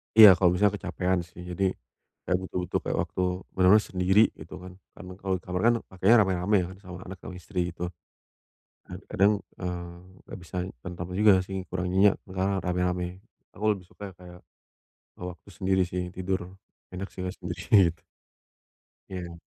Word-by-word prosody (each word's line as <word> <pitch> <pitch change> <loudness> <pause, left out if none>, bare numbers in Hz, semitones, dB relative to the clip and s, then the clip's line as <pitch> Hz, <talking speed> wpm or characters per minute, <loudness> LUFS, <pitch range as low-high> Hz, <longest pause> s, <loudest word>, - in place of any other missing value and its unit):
Iya 110 -1 +12
kalau 90 - +5
misalnya 100 +2 +3
kecapekan 95 -1 0
sih 85 - -13
jadi, 95 +1 +1 0.5
kayak 90 - +1
butuh - - -5
butuh - - 0
kayak - - -2
waktu - - -4 0.3
bener-bener 95 +3 +5
sendiri 95 +2 +4 0.2
gitu 80 - -10
kan 90 0 -9 0.2
karena 90 0 -10
kalau 95 -1 +1
kamar 90 0 -2
kan 120 - +6 0.2
pakainya 95 +5 +4
rame-rame 95 +2 +1
ya - - -4 0.2
sama 90 -2 -8
anak 95 +1 -7
sama 90 - -7
istri 90 -1 -2
gitu. 90 +1 -4 1.0
Nah - - -7
kadang, 100 +2 +4 0.3
eee, 85 -1 -5 0.3
nggak - - -8
bisa 85 - -11 0.3
tentram 90 0 -5
juga 105 -1 +7
sih 95 - -6
kurang 90 0 -2
nyenyak 100 +2 +5
karena 95 +1 0
rame-rame 90 0 0 0.5
aku 105 - -5
lebih 95 -3 -10
suka 100 -2 -9
kayak, 90 -1 -12 0.8
eee, 90 - -4
waktu 90 - -15
sendiri 95 0 +1
sih 90 +1 -2
tidur, 95 +1 -1 0.5
enak 95 +2 -5
sih, - - -9
Mas, 90 +1 -4
sendiri 90 +1 +3
gitu. 85 - -28 1.1
Iya. 85 -3 -6
90 Hz, 165 wpm, -27 LUFS, 90-95 Hz, 1.1 s, Iya